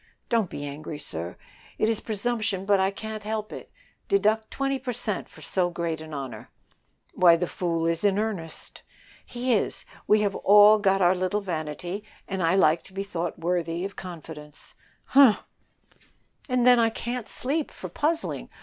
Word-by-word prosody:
"Don't 225 -6 +2
be 145 - -6
angry, 150 +2 -6
sir; 85 - -6 0.4
it 215 - +2
is 225 -1 +1
presumption, 215 -2 -2
but 200 -1 +4
I 190 0 +3
can't 215 +2 -6
help 215 0 -4
it. - - -9 0.4
Deduct 220 - +2
twenty 275 0 -1
per 255 -2 -4
cent 215 -3 -4
for - - -16
so 180 -2 0
great 170 -2 -3
a 160 0 -9
honor." 130 -7 -6 0.6
"Why, 175 -2 +6
the 175 +2 -1
fool 170 -2 -2
is 165 +1 0
in 200 -1 +3
earnest." 200 -7 -4 0.4
"He 245 +1 -1
is; 210 - -1 0.2
we 210 0 +5
have 200 -2 +1
all 210 +1 +7
got 195 -2 +3
our 175 +1 +5
little 185 +3 -1
vanity, 175 +2 -4 0.2
and 190 -1 -3 0.2
like 155 -1 +4
to 190 - -14
be 195 +1 -3
thought 175 -3 -4
worthy 170 0 -1
of 200 - -6
confidence." 160 -4 -10 0.3
"Humph!" 265 -6 +6 1.1
"And 250 -1 +2
then 250 -1 +7
I 230 -1 +4
can't 235 +1 -5
sleep 290 +4 -2
for - - -8
puzzling. 320 +2 -2
195 Hz, 165 wpm, -26 LUFS, 170-220 Hz, 1.1 s, all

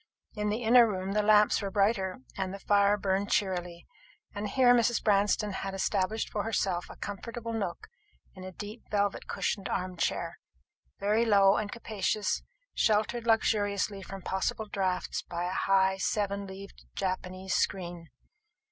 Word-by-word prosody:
In 210 -1 -2
the 220 +3 -2
inner 235 +1 +7
room 190 -2 -3
the 210 +1 +2
lamps 210 0 +4
were 200 - -2
brighter, 195 - +1
and 190 -1 -2
the 195 - -6
fire 200 +1 +3
burned 195 0 0
cheerily; 180 -3 -1 0.5
and 205 0 -3
here 245 +2 +5
Mrs. 240 -1 +2
Branston 205 0 +2
had 195 0 -4
established 195 +2 -1
for 210 - -1
herself 195 -5 -1
a - - -10
comfortable 230 +3 -6
nook 200 -6 -3 0.5
in 185 - -11
a 185 - -7
deep 210 +5 -9
velvet 205 -1 0
cushioned 195 - -2
arm 185 -1 -3
chair, - - -2 0.6
very 210 +3 +2
low 200 -3 +5
and 205 -1 -2
capacious, 215 -2 -1 0.3
sheltered 220 +2 +1
luxuriously 205 -3 +1
from 190 0 -8
possible 190 +3 -1
draughts 190 -3 -2
by 175 0 -5
a 180 - -2
high 190 0 +2
seven 200 0 -1
leaved 195 +1 -10
Japanese 185 0 -3
screen. 175 -3 -2
200 Hz, 150 wpm, -29 LUFS, 190-215 Hz, 0.6 s, inner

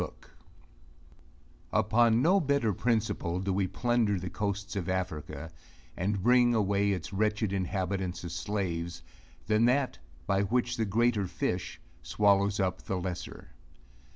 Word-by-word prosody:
II - - -1 1.6
Upon 115 +2 +3
no 185 +4 +5
better 140 - +1
principle 105 -5 0
do 95 +1 -1
we 95 0 +1
plunder 110 +1 +1
the 90 +1 -5
coasts 100 0 -3
of 95 -2 -3
Africa, 80 -3 -4 0.4
and 95 +1 -1
bring 120 0 +5
away 100 -1 +2
its 95 0 -4
wretched 105 0 0
inhabitants 95 -1 -2
as 85 - -5
slaves 85 -5 -3 0.4
than 110 +2 +3
that, 130 +2 +1 0.3
by 100 0 +2
which 120 +4 0
the 110 - +1
greater 110 -1 +1
fish - - -3 0.2
swallows 100 0 +2
up 95 -1 0
the 95 - -3
lesser. 90 -1 -6
100 Hz, 130 wpm, -30 LUFS, 95-115 Hz, 1.6 s, no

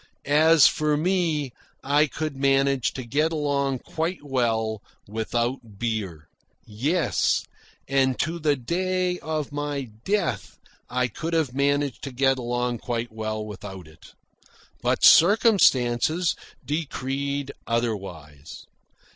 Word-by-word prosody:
As 155 0 +5
for 150 +2 +2
me, 160 -5 0 0.3
I 145 +2 +3
could 155 0 -4
manage 135 -1 +2
to 130 - -6
get 150 +7 +1
along 140 -3 0
quite 165 +1 -3
well 115 -6 -1 0.3
without 115 +1 -3
beer. 100 -9 -3 0.4
Yes, 145 +12 0 0.4
and 135 -2 +2
to 165 +3 -1
the 150 -2 +2
day 180 +6 -1
of 155 -2 -3
my 145 -3 -3
death 205 +1 -1 0.3
I 125 0 0
could 165 +6 -5
have 155 -7 +1
managed 140 0 0
to 135 - -5
get 135 +1 +2
along 120 0 -2
quite 120 -1 -3
well 110 -1 -4
without 95 -4 -9
it. 80 - -17 0.7
But - - +2
circumstance 170 - +5 0.3
decreed 140 -1 -3 0.2
otherwise. 95 -11 -4
135 Hz, 115 wpm, -25 LUFS, 120-155 Hz, 0.7 s, As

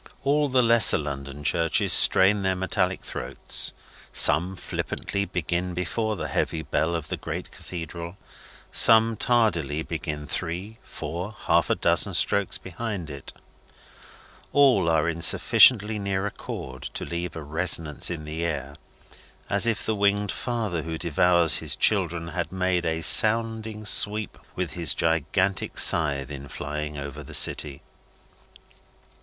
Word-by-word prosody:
All 145 +1 +1
the 130 -1 +3
lesser 115 -1 +6
London 70 -1 -6
churches 85 +2 +1
strain 100 +2 +5
their 95 -1 0
metallic 95 0 -1
throats. 60 - -3 0.4
Some, 90 +6 +3
flippantly 100 +2 -4
begin 90 0 -3
before 110 +5 -2
the - - -5
heavy 80 -1 -2
bell 80 +3 -1
of 80 -3 -5
the - - -3
great - - -6
cathedral; 85 +1 -8 0.5
some, 115 0 +5
tardily 85 - 0
begin 75 -3 -5
three, 90 +8 -5
four, 90 +8 -7
half - - +2
a - - +2
dozen, - - 0
strokes 100 -2 +1
behind 95 -2 -6
it; 70 -1 -9 1.2
all 130 -12 +4
are 80 0 +1
in 85 0 -3
sufficiently 105 +3 +5
near 100 -1 -2
accord, 65 -9 -7
to - - -4
leave 85 0 -5
a 80 - -7
resonance 80 0 +1
in 85 -3 -5
the 80 +2 -5
air, 70 -4 -4 0.7
as 100 +3 +3
if 115 -3 -1
the 110 - 0
winged 100 0 +1
father 110 -9 -3
who 80 0 -5
devours 85 +1 +2
his - - -2
children, 85 -5 +1
had 85 -1 -4
made 90 -1 -1
a 80 0 -2
sounding 110 +2 +2
sweep 105 0 +1 0.2
with - - -3
his - - +2
gigantic 85 +4 -1
scythe 75 -4 +2
in 70 -1 -8
flying 75 +2 -6
over 70 -1 -7
the - - -7
city. 70 -3 +2
90 Hz, 140 wpm, -24 LUFS, 80-105 Hz, 1.2 s, lesser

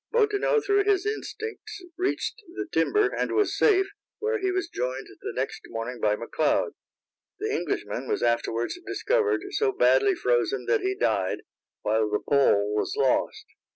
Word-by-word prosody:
Bottineau 430 0 +3
through 405 0 +3
his 405 -2 +2
instincts 430 -1 -5
reached 380 +4 -2
the - - -3
timber, 420 -1 +3
and - - -1
was 420 -1 +2
safe, 390 -3 +4 0.3
where 445 0 -1
he 385 -1 0
was 370 -2 -1
joined 130 - -3 0.2
the - - -4
next - - -3
morning 115 +2 -5
by 105 0 +3
McLeod. 115 +2 0 0.7
The - - -2
Englishman - - -2
was - - -1
afterwards 115 - 0
discovered 430 +1 +1
so 415 0 +1
badly 400 0 +4
frozen - - 0
that 460 -3 +2
he 380 +1 0
died, 405 - 0 0.4
while 110 0 +1
the 105 - +1
Pole 105 -8 +3
was 105 - -1
lost. 135 -2 +1
390 Hz, 155 wpm, -26 LUFS, -, 0.7 s, safe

